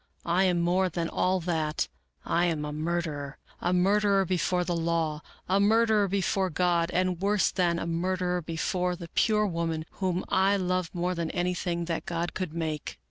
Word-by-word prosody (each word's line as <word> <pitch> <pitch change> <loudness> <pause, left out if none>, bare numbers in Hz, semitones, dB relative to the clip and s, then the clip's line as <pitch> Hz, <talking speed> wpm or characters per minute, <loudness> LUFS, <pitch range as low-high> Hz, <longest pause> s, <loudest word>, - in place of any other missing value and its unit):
I 175 +3 +3
am 175 -2 +2
more 180 +2 +2
than 170 0 -2
all 185 +1 +1
that 160 -3 -1 0.2
— - - -47
I 170 +1 +2
am 160 -3 -1
a 150 - -4
murderer; 155 -3 -3 0.2
a 175 - 0
murderer 195 +2 +3
before 180 0 +1
the 175 0 -1
law; 165 -2 0 0.3
a 190 +2 +3
murderer 215 0 +4
before 190 0 0
God; 175 0 +1
and 180 -1 0
worse 200 0 +2
than 175 -2 +1
a - - -3
murderer 180 +1 -1
before 180 +2 -1
the 170 -1 -9
pure 210 +2 +2
woman 165 -3 -2 0.2
whom 185 -1 0
I 195 +2 +3
love 185 -2 -1
more 180 +1 0
than 170 -2 -2
anything 175 -1 -1
that 165 -1 -3
God 170 0 -2
could 185 -4 -3
make." 160 -2 -4
175 Hz, 180 wpm, -28 LUFS, 170-185 Hz, 0.3 s, murderer